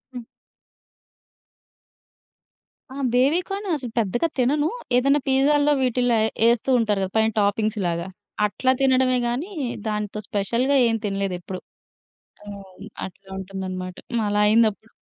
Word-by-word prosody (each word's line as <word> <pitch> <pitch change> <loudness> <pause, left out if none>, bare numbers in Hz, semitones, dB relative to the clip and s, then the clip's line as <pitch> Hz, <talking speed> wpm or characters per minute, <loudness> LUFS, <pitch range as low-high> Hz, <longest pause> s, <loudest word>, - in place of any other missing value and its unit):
హ్మ్. 245 - -6 2.7
ఆ! - - -9 0.2
బేబీ 275 +8 +3
కాను 400 +1 -4
అసలు 245 -4 -7
పెద్దగా 235 - 0
తినను. 290 +5 +2 0.3
ఏదన్నా 275 +4 +3
పీజాల్లో, 290 +2 +3
వీటిల్లో 245 -1 +2
ఎ 220 - 0 0.2
యేస్తూ 235 +2 0
ఉంటారు 210 -3 +1
గదా 190 - -3
పైన 220 0 +3
టాపింగ్స్‌లాగా. 200 -4 0 0.4
అట్లా 255 +5 +1
తినడమే 260 -1 +3
గానీ, 280 +12 -3 0.4
దాంతో 210 0 -3
స్పెషల్‌గా 240 +7 +1
ఏం 225 - +1
తినలేదెప్పుడూ. 190 -2 -3 0.8
హ్మ్. 200 -1 -11 0.2
అట్లా 190 +1 -18
ఉంటుందనమాట. 185 -1 -6 0.2
హ్మ్. 230 -2 +1
అలా 205 0 +1
అయిందప్పుడు. 220 0 +2
225 Hz, 115 wpm, -23 LUFS, 200-260 Hz, 2.7 s, బేబీ